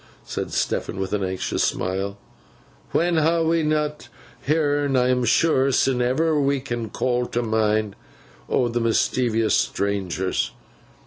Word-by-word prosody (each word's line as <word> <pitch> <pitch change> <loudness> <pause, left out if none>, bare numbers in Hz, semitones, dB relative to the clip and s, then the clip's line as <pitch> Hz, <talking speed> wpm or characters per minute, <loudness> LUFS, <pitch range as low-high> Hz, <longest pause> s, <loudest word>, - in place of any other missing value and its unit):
said - - -4
Stephen, - - -2
with 95 +1 -3
an 105 -1 0
anxious 95 0 -1
smile; 95 +2 -2 0.7
'when 170 0 +1
ha 165 +2 +3
we 165 +1 +2
not 150 -1 -1 0.4
heern, 145 -2 +1
I 125 0 +3
am 125 -1 +2
sure, 135 +1 +3
sin 130 -1 +2
ever 150 +5 +2
we 140 0 +1
can 120 -4 -4
call 125 +2 -1
to 120 - -2
mind, 110 -2 0 0.5
o' 125 - +2
th' 120 0 -1
mischeevous 115 0 +1
strangers! 95 -2 -1
125 Hz, 135 wpm, -23 LUFS, 110-145 Hz, 0.7 s, ha